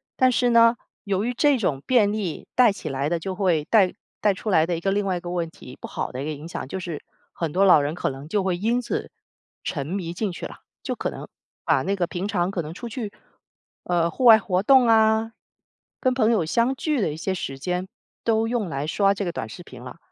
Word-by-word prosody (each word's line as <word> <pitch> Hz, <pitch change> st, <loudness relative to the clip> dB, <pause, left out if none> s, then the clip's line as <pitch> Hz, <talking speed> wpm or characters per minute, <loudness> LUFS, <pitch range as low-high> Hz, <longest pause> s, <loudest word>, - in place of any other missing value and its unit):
但 255 Hz, 0 st, +4 dB
是 245 Hz, 0 st, +2 dB
呢， 230 Hz, 0 st, +6 dB, 0.3 s
由 200 Hz, -1 st, -1 dB
于 245 Hz, -, -1 dB
这 285 Hz, +2 st, +3 dB
种 150 Hz, -, -1 dB
便 225 Hz, -6 st, +4 dB
利 200 Hz, -7 st, -4 dB
带 245 Hz, -3 st, +6 dB
起 200 Hz, -, -8 dB
来 135 Hz, +2 st, -1 dB
的 170 Hz, -, 0 dB
就 190 Hz, +3 st, -4 dB
会 180 Hz, -6 st, +1 dB
带 195 Hz, -2 st, +4 dB, 0.3 s
带 205 Hz, -1 st, +3 dB
出 215 Hz, -, -5 dB
来 160 Hz, -3 st, +4 dB
的 170 Hz, -1 st, -1 dB
一 -, -, -4 dB
个 195 Hz, +3 st, 0 dB
另 205 Hz, +1 st, +1 dB
外 185 Hz, -2 st, 0 dB
一 -, -, -4 dB
个 175 Hz, 0 st, -6 dB
问 170 Hz, -2 st, -2 dB
题， 130 Hz, -5 st, -13 dB
不 -, -, -6 dB
好 -, -, -4 dB
的 130 Hz, -, -5 dB
一 -, -, -4 dB
个 155 Hz, -, -2 dB
影 150 Hz, +2 st, -9 dB
响， 170 Hz, -, -6 dB
就 190 Hz, -, -5 dB
是 170 Hz, -4 st, -6 dB, 0.3 s
很 165 Hz, -3 st, -3 dB
多 190 Hz, +5 st, +3 dB
老 175 Hz, -6 st, +7 dB
人 145 Hz, +3 st, -2 dB
可 175 Hz, -, -1 dB
能 135 Hz, +2 st, -9 dB
就 200 Hz, +4 st, 0 dB
会 185 Hz, -2 st, 0 dB
因 230 Hz, +6 st, +1 dB
此 245 Hz, -, -3 dB, 0.5 s
沉 140 Hz, -5 st, -3 dB
迷 175 Hz, -1 st, -3 dB
进 200 Hz, +2 st, -2 dB
去 170 Hz, -, -7 dB
了。 -, -, -8 dB, 0.3 s
就 -, -, -3 dB
可 -, -, -2 dB
能 -, -, -8 dB, 0.4 s
把 130 Hz, -, +2 dB
那 195 Hz, +3 st, 0 dB
个 180 Hz, -3 st, 0 dB
平 180 Hz, +3 st, -4 dB
常 185 Hz, -3 st, 0 dB
可 185 Hz, -, -2 dB
能 155 Hz, +1 st, -7 dB
出 235 Hz, +6 st, -7 dB
去， 220 Hz, -2 st, -5 dB, 0.7 s
呃， 170 Hz, -1 st, +1 dB
户 255 Hz, -, -5 dB
外 225 Hz, -2 st, +9 dB
活 185 Hz, -2 st, -1 dB
动 260 Hz, +1 st, +6 dB
啊， 220 Hz, 0 st, +3 dB, 0.7 s
跟 255 Hz, -, +2 dB
朋 230 Hz, -3 st, +3 dB
友 215 Hz, -7 st, +2 dB
相 235 Hz, +10 st, +1 dB
聚 300 Hz, +1 st, -1 dB
的 175 Hz, -, 0 dB
一 -, -, -8 dB
些 190 Hz, +4 st, -2 dB
时 135 Hz, -6 st, -5 dB
间 180 Hz, +4 st, -2 dB, 0.4 s
都 225 Hz, 0 st, +2 dB
用 230 Hz, -4 st, -1 dB
来 145 Hz, -2 st, -3 dB
刷 195 Hz, +4 st, +3 dB
这 200 Hz, -, -3 dB
个 175 Hz, -, -2 dB
短 115 Hz, -, -5 dB
视 110 Hz, -, -10 dB
频 130 Hz, -8 st, -12 dB
了。 125 Hz, +5 st, -9 dB
190 Hz, 270 characters per minute, -24 LUFS, 165-220 Hz, 0.7 s, 外